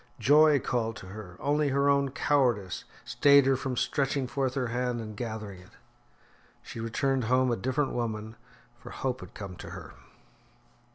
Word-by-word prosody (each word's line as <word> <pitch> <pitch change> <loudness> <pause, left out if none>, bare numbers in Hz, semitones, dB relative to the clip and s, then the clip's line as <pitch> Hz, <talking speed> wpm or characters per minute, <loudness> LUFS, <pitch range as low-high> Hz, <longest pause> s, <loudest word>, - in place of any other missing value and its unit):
Joy 150 +1 +5
called 115 -3 -2
to 95 - -10
her; 95 -3 -10
only 145 +1 +1
her 140 +1 +2
own 140 -1 +3
cowardice 125 -9 0 0.2
stayed 140 -1 +5
her 135 0 +3
from 130 -1 -3
stretching 135 0 0
forth 130 +1 -2
her 125 -3 -1
hand 125 0 -1
and 110 -2 -7
gathering 110 -4 -6
it. 90 - -17 0.9
She - - -8
returned 125 +3 0
home 130 +2 +2
a - - +2
different 130 +6 -1
woman, 110 -2 -3 0.4
for - - -11
hope 130 -1 -3
had - - -12
come 100 -3 -7
to - - -9
her. - - -9
125 Hz, 165 wpm, -28 LUFS, 110-140 Hz, 0.9 s, Joy